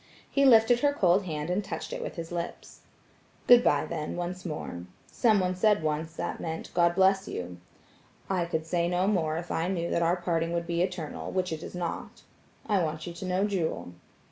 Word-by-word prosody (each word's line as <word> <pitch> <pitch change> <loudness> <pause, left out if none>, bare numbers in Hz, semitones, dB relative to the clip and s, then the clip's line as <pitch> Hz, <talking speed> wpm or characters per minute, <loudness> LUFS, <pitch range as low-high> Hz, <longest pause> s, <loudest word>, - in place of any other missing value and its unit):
He 275 0 +2
lifted 235 -1 +6
her 285 +2 +2
cold 190 -6 +3
hand 155 -1 -3
and 195 +4 0
touched - - -5
it - - -4
with - - -5
his 165 0 -6
lips. 170 0 -6 0.7
"Good 245 0 +8
bye, 145 - +3
then, 155 -3 -4
once 175 +1 -4
more; 120 - -5 0.3
someone 195 -6 +2
said 210 -1 +3
once 155 +1 -2
that - - -4
meant 160 0 -5
'God 170 0 +3
bless 190 +1 +3
you'; 90 0 -5 0.7
I 185 -3 0
could 160 -2 -2
say 170 +1 0
no 180 +1 +1
more 165 -6 +1
if 175 +1 -5
I 165 +2 0
knew 170 -2 -2
that 170 - +1
our 170 +1 +3
parting 170 -2 -1
would 170 0 -1
be 170 0 -1
eternal 180 -4 -3
which 185 -2 -1
it 160 - -5
is - - -8
not. 175 -2 -5 0.4
I 205 -4 +2
want 155 -1 -3
you 175 - -6
to 185 - -7
know 185 +2 +1
Jewel." 160 - -2
175 Hz, 200 wpm, -28 LUFS, 165-190 Hz, 0.7 s, Good